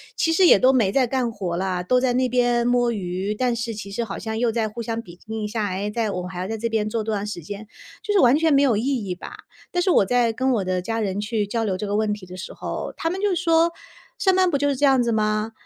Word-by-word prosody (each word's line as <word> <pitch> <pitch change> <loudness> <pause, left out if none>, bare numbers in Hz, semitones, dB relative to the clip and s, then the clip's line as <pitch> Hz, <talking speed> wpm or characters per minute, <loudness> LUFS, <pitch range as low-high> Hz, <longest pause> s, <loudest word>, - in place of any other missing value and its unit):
其 325 0 +1
实 360 +1 +5
也 - - +8
都 260 +1 +4
没 215 -7 +3
在 260 +1 +3
干 245 -1 -1
活 185 -5 -4
啦， 180 -1 -2
都 250 +7 +3
在 250 -1 +1
那 255 0 +2
边 240 -1 +2
摸 245 -1 +2
鱼， 195 0 -3
但 245 0 0
是 230 -1 -4
其 200 -1 -7
实 235 +4 -2
好 200 - -6
像 220 0 -4
又 240 -2 +2
在 220 -1 0
互 235 +3 -7
相 230 0 -3
比 175 -4 -14
拼 220 -1 -5
一 - - -1
下， 215 -1 -2
哎， 200 +2 -3
在 225 -1 -1
我 180 -2 -3
们 180 - -6
还 180 - -6
要 185 - -3
在 225 0 -3
这 230 +2 -2
边 215 -2 -1
做 220 0 -2
多 220 -1 -2
长 205 +1 -3
时 175 -5 -5
间， 205 +4 -8 0.3
就 425 - -3
是 410 - +4
完 250 +2 +6
全 320 0 +2
没 280 0 +5
有 245 -6 +3
意 215 - -1 0.2
义 180 - -2
吧。 180 - -9 0.3
但 355 - -1
是 375 - +2
我 - - +5
在 240 0 +2
跟 260 +3 0
我 205 -5 0
的 185 0 -1
家 225 +4 -3
人 200 -1 -2
去 210 -1 -1
交 225 +2 -2
流 190 -3 -1
这 210 - -4
个 205 0 -2
问 215 -1 +1
题 205 -3 -5
的 180 +1 -10
时 185 - -7
候， - - -5
他 330 - -1
们 380 +2 -4
就 400 -3 +1
说， 330 0 +3 0.5
“上 380 -2 +3
班 370 -1 +4
不 280 - +1
就 285 +1 0
是 280 - +1
这 290 - -4
样 265 -2 +4
子 235 - 0
吗？ 215 0 0
225 Hz, 320 characters per minute, -23 LUFS, 205-255 Hz, 0.5 s, 也